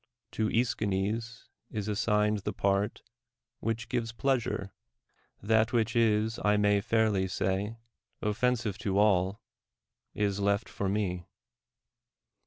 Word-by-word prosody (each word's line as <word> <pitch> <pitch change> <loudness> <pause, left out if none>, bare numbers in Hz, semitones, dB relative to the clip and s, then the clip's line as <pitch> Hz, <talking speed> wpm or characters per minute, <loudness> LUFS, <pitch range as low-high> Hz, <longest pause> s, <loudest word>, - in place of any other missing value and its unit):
To 110 -1 0
JEschines 115 0 -1 0.3
is 105 -2 -4
assigned 105 0 +1
the 100 +1 -4
part 100 0 0 0.6
which 115 +1 -2
gives 115 -1 -2
pleasure; 115 -5 -1 0.7
that 110 +2 +3
which 115 -1 +1
is 110 -1 +2
(I 105 0 +4
may 105 -1 +3
fairly 110 -3 +2
say) 95 +4 -1 0.4
offensive 110 -1 0
to 100 -1 -1
all, 100 0 +3 0.7
is 100 -1 0
left 100 0 +1
for 100 - -2
me. 90 -4 -2
105 Hz, 110 wpm, -30 LUFS, 100-115 Hz, 0.7 s, I